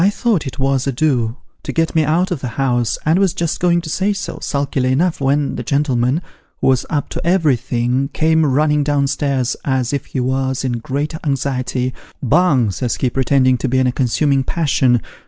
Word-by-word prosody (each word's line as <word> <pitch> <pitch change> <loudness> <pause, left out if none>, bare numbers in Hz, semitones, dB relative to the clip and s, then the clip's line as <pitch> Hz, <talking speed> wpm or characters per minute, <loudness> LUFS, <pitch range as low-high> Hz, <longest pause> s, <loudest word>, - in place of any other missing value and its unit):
1 190 - +5
thought 205 - 0
it 135 - -7
was 135 0 0
a - - +1
do, 125 -4 0 0.2
to - - -5
get 165 0 0
me 160 - +3
out 170 +6 +1
of 160 -6 -2
the 130 - -3
house, 120 -4 +1
and 160 +4 +3
was 195 -2 +2
just 170 -3 -2
going 175 -1 +3
to 170 - -7
say 190 +6 0
so, 200 -1 -5
sulkily 140 -2 -1
enough, 165 +4 +1
when 140 +1 +1
the - - -3
gentleman 135 +3 0 0.4
(who - - -2
was 130 -1 +1
up 145 -3 -1
to - - -5
everything) 130 -6 +1
came 160 0 +2
running 150 +1 +2
down 145 -1 +1
stairs, 135 -3 -1
as 130 -2 -1
if 140 - -4
ho 130 - +1
was 130 0 -1
in 130 - 0
great 140 +6 -3
anxiety. 130 -2 -1 0.2
' - - -24 0.2
Bung,' 135 - +2
says 120 +4 -2
he, 125 - -1
pretending 130 -1 +2
to - - -1
be 130 - +1
in 130 - +3
a 125 - +2
consuming 135 +2 +1
passion. 130 -6 +1
140 Hz, 205 wpm, -18 LUFS, 130-155 Hz, 0.4 s, 1